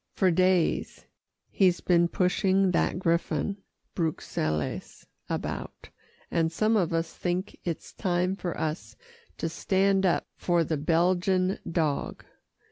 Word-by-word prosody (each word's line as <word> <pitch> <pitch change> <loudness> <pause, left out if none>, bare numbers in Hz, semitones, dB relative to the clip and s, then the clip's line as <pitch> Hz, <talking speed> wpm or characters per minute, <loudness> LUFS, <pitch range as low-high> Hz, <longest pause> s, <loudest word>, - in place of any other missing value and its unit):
"For 185 -2 +3
days 185 0 +1 0.5
he's 185 -3 +3
been 175 -1 +3
pushing 190 +1 +2
that 175 - +1
griffon 170 +1 0 0.4
Bruxelles 80 - -3 0.2
about, - - -5 0.4
and 165 -1 +1
some 215 +6 +2
of 180 -6 +2
us 165 0 -1
think 180 +2 -3
it's 170 -3 -4
time 180 +1 0
for 175 -3 -4
us 155 +1 -3 0.4
to - - -2
stand 195 +3 +1
up 175 - +1
for 175 -2 +1
the 160 0 -1
Belgian 180 +4 +2
dog. 155 -4 -1
175 Hz, 120 wpm, -27 LUFS, 165-185 Hz, 0.5 s, For